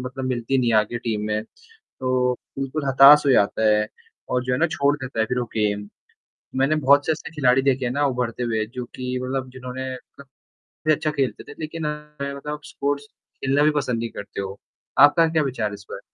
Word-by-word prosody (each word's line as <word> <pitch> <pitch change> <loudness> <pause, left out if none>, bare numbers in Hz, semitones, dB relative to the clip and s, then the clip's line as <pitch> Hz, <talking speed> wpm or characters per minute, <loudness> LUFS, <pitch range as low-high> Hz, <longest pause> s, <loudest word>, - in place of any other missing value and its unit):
मतलब 130 +1 -5
मिलती 130 +1 0
नहीं 120 -2 +2
है - - +5
आगे 110 +3 +1
टीम 110 -3 -2
में, 105 0 -1 0.4
तो 130 - -1 0.3
बिल्कुल 135 +2 -3
हताश 135 +2 +8
हो 140 - +4
जाता 110 -1 +3
है 105 0 +2 0.4
और 125 0 0
जो 125 0 -1
है 125 - 0
ना 170 - +3
छोड़ 140 +1 +2
देता 130 -4 -6
है 110 - +3
फिर 125 +3 -1
वो 120 - -1
गेम, 105 -1 0 0.7
मैंने 135 +4 +2
बहुत 140 +1 +6
से 160 - +3
ऐसे 155 - -6
खिलाड़ी 130 -3 +3
देखे 135 -1 +1
हैं 120 - -1
ना 145 +2 +1
उभरते 125 -2 -2
हुए 110 -2 0
जो 125 - -2
कि 125 0 -3
मतलब 130 0 -3
जिन्होंने 130 +1 -6 1.0
भी 155 - +6
अच्छा 155 +1 0
खेलते 140 -4 -2
थे, - - -11
लेकिन 155 0 -4
मतलब 150 -1 -5
स्पोर्ट्स 145 0 -3 0.3
खेलना 135 +2 +1
भी 155 - +5
पसंद 125 -4 -2
नहीं 115 0 -3
करते 100 -1 -7
हो। 100 0 -6 0.4
आपका 145 +4 +7
क्या 160 -1 +2
विचार 125 -6 -1
है - - -7
इस 100 0 -11
पर? - - -6
130 Hz, 210 wpm, -23 LUFS, 120-145 Hz, 1.0 s, हताश